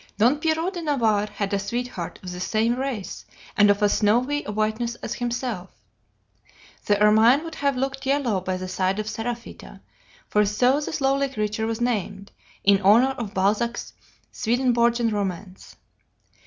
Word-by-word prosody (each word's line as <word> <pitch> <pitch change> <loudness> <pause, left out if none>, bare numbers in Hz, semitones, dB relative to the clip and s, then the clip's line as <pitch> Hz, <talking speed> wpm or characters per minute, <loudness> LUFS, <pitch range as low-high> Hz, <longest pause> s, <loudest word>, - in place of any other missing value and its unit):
"Don 240 +7 +4
Pierrot 325 +4 0
de 350 - -5
Navarre 225 -9 +1
had 205 -1 -4
a 200 - +1
sweetheart 235 -4 -4
of 180 - -6
the 180 - -7
same 220 +5 +1
race 255 -6 -4 0.3
and 205 0 +5
of 205 +1 +2
as 205 - +3
snowy 250 +8 +2
a - - -4
whiteness 220 +3 -1
as - - -5
himself. 240 -6 -3 1.2
The 205 -1 +3
ermine 220 +7 +5
would 330 -1 -7
have 280 -3 -1
looked 270 +1 -3
yellow 265 -8 +1
by 185 0 -2
the 185 0 -6
side 185 +1 -1
of 215 - -2
Seraphita, 230 +1 -6 0.5
for 210 - +3
so 245 +7 +2
this 300 0 -4
lovely 275 +1 +2
creature 215 -2 -2
was 225 +1 -3
named, 205 -4 -2 0.3
in 200 0 +4
honor 225 +7 +5
of 205 -4 -6
Balzac's 210 +5 0 0.4
Swedenborgian 235 -1 +1
romance. 195 -2 -5
225 Hz, 155 wpm, -24 LUFS, 205-255 Hz, 1.2 s, and